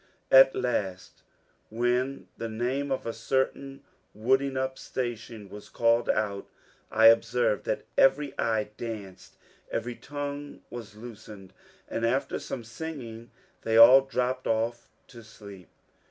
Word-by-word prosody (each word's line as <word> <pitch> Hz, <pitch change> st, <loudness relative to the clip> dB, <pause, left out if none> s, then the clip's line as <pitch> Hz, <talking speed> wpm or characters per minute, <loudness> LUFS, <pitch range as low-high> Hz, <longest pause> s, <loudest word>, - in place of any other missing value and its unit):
At 135 Hz, 0 st, +8 dB
last, 95 Hz, -7 st, -3 dB, 0.5 s
when 125 Hz, +4 st, -1 dB
the 115 Hz, -, -5 dB
name 130 Hz, +5 st, -2 dB
of 135 Hz, -, -2 dB
a 115 Hz, -, -3 dB
certain 135 Hz, +4 st, -2 dB, 0.3 s
wooding 135 Hz, +5 st, +1 dB
up 130 Hz, 0 st, -2 dB
station 115 Hz, -4 st, -5 dB
was 105 Hz, +1 st, -11 dB
called 115 Hz, 0 st, +2 dB
out, 100 Hz, -2 st, -1 dB, 0.4 s
I 110 Hz, +1 st, +3 dB
observed 115 Hz, 0 st, +4 dB
that -, -, -2 dB, 0.2 s
every 135 Hz, +1 st, +4 dB
eye 110 Hz, -2 st, 0 dB
danced, 105 Hz, -5 st, -8 dB, 0.3 s
every 120 Hz, +2 st, -3 dB
tongue 145 Hz, +2 st, -6 dB
was 115 Hz, -3 st, -8 dB
loosened, 110 Hz, -4 st, -11 dB, 0.3 s
and 115 Hz, -, -4 dB
after 125 Hz, +4 st, 0 dB
some 120 Hz, -, -6 dB
singing 115 Hz, -2 st, -8 dB, 0.3 s
they 110 Hz, 0 st, +1 dB
all 125 Hz, +4 st, +10 dB
dropped 130 Hz, -1 st, -2 dB
off 115 Hz, +1 st, -1 dB, 0.2 s
to 120 Hz, -3 st, -12 dB
sleep. 100 Hz, -4 st, -13 dB
115 Hz, 125 wpm, -27 LUFS, 110-130 Hz, 0.5 s, all